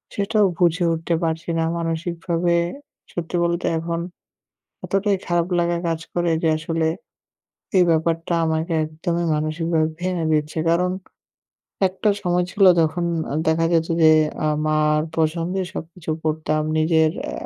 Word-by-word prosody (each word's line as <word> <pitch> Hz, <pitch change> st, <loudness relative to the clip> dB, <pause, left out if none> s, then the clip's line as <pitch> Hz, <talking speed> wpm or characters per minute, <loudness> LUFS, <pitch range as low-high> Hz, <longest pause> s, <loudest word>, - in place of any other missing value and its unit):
সেটাও 205 Hz, +1 st, +2 dB
বুঝে 175 Hz, 0 st, +3 dB
উঠতে 165 Hz, +1 st, -1 dB
পারছি 160 Hz, 0 st, -2 dB
না। -, -, +2 dB
মানসিকভাবে 170 Hz, +1 st, -1 dB, 0.6 s
সত্যি 175 Hz, 0 st, -4 dB
বলতে 170 Hz, 0 st, 0 dB
এখন 165 Hz, +1 st, -3 dB, 0.9 s
এতটাই 195 Hz, +1 st, +1 dB
খারাপ 175 Hz, -1 st, +1 dB
লাগা 175 Hz, 0 st, +1 dB
কাজ 165 Hz, -1 st, -1 dB
করে 175 Hz, -1 st, +1 dB
যে -, -, +4 dB
আসলে 165 Hz, 0 st, -1 dB, 0.9 s
এই 180 Hz, -, +6 dB
ব্যাপারটা 165 Hz, +1 st, +1 dB
আমাকে 160 Hz, +1 st, -1 dB
একদমই 170 Hz, +2 st, -2 dB
মানসিকভাবে 155 Hz, +1 st, 0 dB
ভেঙে 180 Hz, -2 st, -1 dB
দিচ্ছে। 155 Hz, +1 st, 0 dB
কারণ 180 Hz, +2 st, +2 dB, 1.0 s
একটা 190 Hz, +3 st, -1 dB
সময় 180 Hz, -2 st, +1 dB
ছিল 200 Hz, -, +1 dB, 0.2 s
যখন 170 Hz, +2 st, 0 dB, 0.4 s
দেখা 160 Hz, +1 st, +2 dB
যেত 165 Hz, -1 st, +2 dB, 0.2 s
যে 155 Hz, -, +8 dB, 0.3 s
আ -, -, +2 dB, 0.2 s
মার 150 Hz, 0 st, +2 dB, 0.2 s
পছন্দে 165 Hz, +4 st, 0 dB
সবকিছু 165 Hz, 0 st, -8 dB
পরতাম। 155 Hz, -1 st, 0 dB
নিজের 160 Hz, 0 st, +3 dB
আ 300 Hz, -, -5 dB
165 Hz, 130 wpm, -22 LUFS, 160-175 Hz, 1.0 s, যে